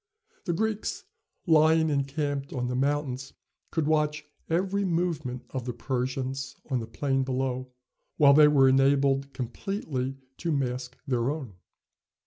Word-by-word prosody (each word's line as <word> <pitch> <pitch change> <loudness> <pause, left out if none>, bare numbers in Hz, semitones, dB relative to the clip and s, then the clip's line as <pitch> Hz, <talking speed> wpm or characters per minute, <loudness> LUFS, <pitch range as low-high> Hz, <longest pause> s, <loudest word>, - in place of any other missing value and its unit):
The 175 - 0
Greeks, 220 - -2 0.4
lying 160 -1 +5
encamped 140 0 -1
on 125 -2 -2
the 125 - -2
mountains, 135 -1 -1 0.4
could 160 -3 -1
watch 150 0 +1 0.2
every 190 +4 +1
movement 165 -8 -1
of 130 -3 -4
the 125 - -3
Persians 130 +2 -3 0.2
on 130 - +2
the 115 - -6
plain 135 +3 0
below, 130 -1 -2 0.5
while 140 -2 +7
they 150 +1 +8
were 140 -3 +5
enabled 135 +1 +3
completely 135 - -4 0.2
to 170 - -2
mask 125 -3 -2
their 125 -3 0
own. 140 -8 -4
140 Hz, 130 wpm, -28 LUFS, 130-155 Hz, 0.5 s, they